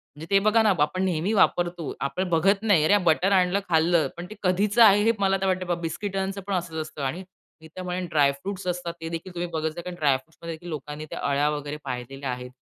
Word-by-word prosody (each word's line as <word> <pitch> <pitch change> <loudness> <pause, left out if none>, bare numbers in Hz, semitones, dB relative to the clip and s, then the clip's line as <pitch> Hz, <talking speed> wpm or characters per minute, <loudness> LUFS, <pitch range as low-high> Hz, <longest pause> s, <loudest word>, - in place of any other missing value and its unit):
म्हणजे 150 +2 -9
ते 195 - +5
बघा 220 +1 +5
ना, 215 - +4
आपण 185 +6 +1
नेहमी 180 +1 0
वापरतो. 175 -5 +1
आपण 140 +7 -2
बघत 195 +5 +2
नाही. 200 -8 +4
अरे 205 +6 +5
बटर 175 +3 +3
आणलं, 185 0 +3
खाल्लं, 165 0 +3
पण 175 - -6
ते 215 - -9
कधीच 200 +4 +1
आहे? 205 -3 +7
हे 225 - +4
मला 195 -1 +2
आता 195 0 -1
वाटत 185 0 0 0.2
बिस्किटांचं 195 +3 -3
पण 200 - -2
असचं 170 -3 -2
असतं 155 -1 -8
आणि 160 +8 -3 0.4
मी 160 - -12
त्या 185 +4 -9
म्हणेन 180 0 -3
ड्राय 145 -3 +4
फ्रुट्स 185 +7 -6
असतात. 175 -1 -2
ते 165 - -4
देखील 170 +2 -6
तुम्ही 175 0 -3
बघत 160 0 0
जा, - - -5
कारण 180 +1 -7
ड्राय 140 -3 +3
फ्रुट्स 145 +5 -22
मध्ये 165 -1 -5
देखील 175 +2 -11
लोकांनी 150 0 -6
त्या - - -6
अळ्या 140 +1 +2
वगैरे 145 0 -4
पाहिलेल्या 130 +2 -5
आहेत. 125 0 -6
175 Hz, 230 wpm, -25 LUFS, 155-190 Hz, 0.4 s, आहे